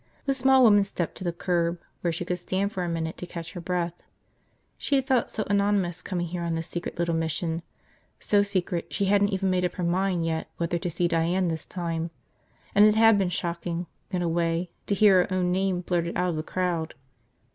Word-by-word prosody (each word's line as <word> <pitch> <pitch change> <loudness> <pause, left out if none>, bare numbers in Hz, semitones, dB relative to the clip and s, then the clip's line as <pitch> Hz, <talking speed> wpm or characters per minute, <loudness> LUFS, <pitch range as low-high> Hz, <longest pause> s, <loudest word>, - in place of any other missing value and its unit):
The 275 - +2
small 265 0 +5
woman 205 -3 +6
stepped 180 -4 -3
to - - -6
the 175 - 0
curb 170 0 0 0.2
where 170 - +1
she 170 +2 -3
could 180 0 -2
stand 190 +3 -1
for 185 -4 -3
a 175 - -2
minute 165 -1 -3
to 180 - -7
catch 170 -2 -7
her 175 - -6
breath. 175 -1 -1 0.8
She 280 - -1
had 270 -1 +2
felt 260 -3 +2
so 215 - -2
anonymous, 200 -3 +1
coming 175 -3 -2
here 175 +1 -4
on 170 -1 -1
this 165 0 -3
secret 175 0 -5
little 170 0 0
mission 165 +1 -1 0.3
– - - -33 0.3
so 205 -1 +3
secret 185 -3 -2
she 200 - 0
hadn't 200 +1 +3
even 190 -1 0
made 180 0 +1
up 180 - 0
her 180 - -3
mind 180 0 +1
yet 160 -1 -2
whether 170 0 -1
to 175 - -2
see 175 +1 0
Diane 170 +2 +1
this 160 -1 -4
time 170 -2 -3 0.3
– - - -34
and 205 - +6
it 215 0 +6
had 225 -1 +6
been 190 -2 +1
shocking, 170 0 -3 0.2
in 180 -1 -1
a - - 0
way, 170 +1 0 0.2
to 200 - +1
hear 200 -3 +6
her 180 - -3
own 180 -1 +1
name 185 -1 +1
blurted 175 -1 -1
out 180 - +1
of - - -3
the 155 - -1
crowd. 170 -1 -2
180 Hz, 225 wpm, -26 LUFS, 170-195 Hz, 0.8 s, woman